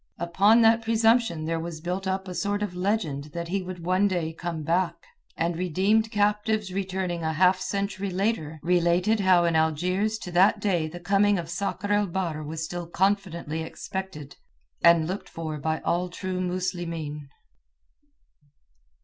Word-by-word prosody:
Upon 200 +7 +4
that 225 +1 +5
presumption 225 -6 +2
there 165 0 -1
was 165 -1 -6
built 180 +4 -3
up 190 0 -2
a 180 - -5
sort 205 +2 -1
of 200 -4 -3
legend 180 -7 -1
that 170 0 -4
he 195 +2 0
would 180 -2 -7
one 185 +3 +3
day 170 -4 -2
come 165 -1 -5
back; 175 +3 +1 0.4
and 170 +1 0
redeemed 190 +6 +1
captives 210 -1 0
returning 185 -3 -2
a 160 0 -1
half 185 +3 +4
century 200 0 -2
later 185 -5 -1
related 180 +5 +2
how 185 -3 +4
in 170 -1 +1
Algiers 180 +7 +1
to 180 - -6
that 190 +5 +4
day 180 -6 0
the 175 +3 -8
coming 200 +3 +3
of 165 -1 -5
Sakr 200 +2 -3
el 205 0 +3
Bahr 170 -4 -2
was 155 +1 -4
still 175 +1 -5
confidently 170 -4 -1
expected 160 -2 -6 0.4
and 170 -2 +6
looked 190 +5 -5
for 155 -2 -5
by 160 +2 -1
all 180 +1 0
true 185 +1 -4
Muslimeen. 170 -5 -3
180 Hz, 160 wpm, -26 LUFS, 165-200 Hz, 0.4 s, and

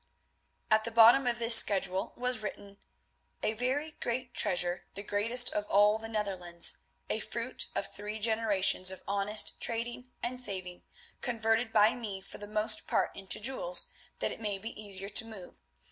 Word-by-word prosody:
At 215 0 +4
the 230 - -2
bottom 235 +3 +6
of 240 -1 0
this 230 0 +5
schedule 190 -3 +4
was 250 -1 -1
written, 200 -1 -8 0.6
"A 215 - +1
very 260 +7 -2
great 250 -2 -4
treasure, 175 -3 +1
the 200 - -5
greatest 230 +5 +2
of 210 0 -2
all 210 +2 +4
the 225 0 -7
Netherlands, 185 -6 -1 0.3
a - - -1
fruit - - -3
of - - -1
three 210 +1 -6
generations 215 -4 +2
of 190 - -4
honest 200 +2 0
trading 240 +2 -2
and 250 +1 -2
saving, 185 -6 -3 0.4
converted 225 -1 0
by 215 0 +5
me 210 -5 -5
for 190 - -11
the 205 - -8
most 215 +1 0
part - - 0
into 195 -1 -2
jewels, 270 - 0 0.3
that - - -1
it - - -8
may 205 -3 -2
be 220 +4 -7
easier 195 -1 -7
to 205 - +1
move. 215 -5 -11
215 Hz, 165 wpm, -30 LUFS, 200-235 Hz, 0.6 s, bottom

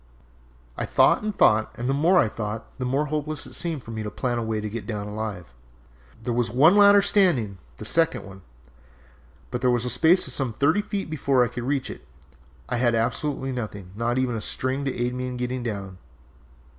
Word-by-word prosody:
"I - - -3
thought - - +4
and 210 -1 -4
thought, 110 0 +3
and 120 0 -3
the 135 - +1
more 165 +7 +3
I 145 - +5
thought 110 +1 -5
the 125 - -2
more 135 +4 0
hopeless 155 -1 -2
it - - -9
seemed 160 -7 -3
to 115 - -9
me 110 -1 -4
to 105 - -4
plan 120 +1 -2
a - - -2
way 110 -1 -2
to 105 - -4
get 105 -1 -6
down 105 -3 -4
alive. 105 - -6 0.7
There 120 - -1
was 120 -1 0
one 145 - +5
ladder 205 -1 +7
still 205 - +3
standing, 110 - -2 0.2
the - - -8
second 165 +3 +1
one, 95 0 -12 1.1
but 125 - -3
there 125 - +3
was 120 -1 +1
a 125 - +1
space 160 +9 +4
of 130 - -1
some 130 -4 -1
thirty 160 - +2
feet 205 -1 -4
before 140 -5 +2
I - - -4
could 120 -1 -6
reach 140 0 -1
it. - - -11 0.6
I 120 - -1
had 120 -1 +2
absolutely 135 +4 -1
nothing, 105 -7 -6
not 120 +3 -1
even 130 -2 0
a 110 - -3
string, 130 +5 -2
to 135 - -2
aid 120 +1 -1
me 125 0 -3
in 125 -1 -5
getting 125 +1 -3
down. 100 -5 -5
125 Hz, 220 wpm, -24 LUFS, 110-140 Hz, 1.1 s, ladder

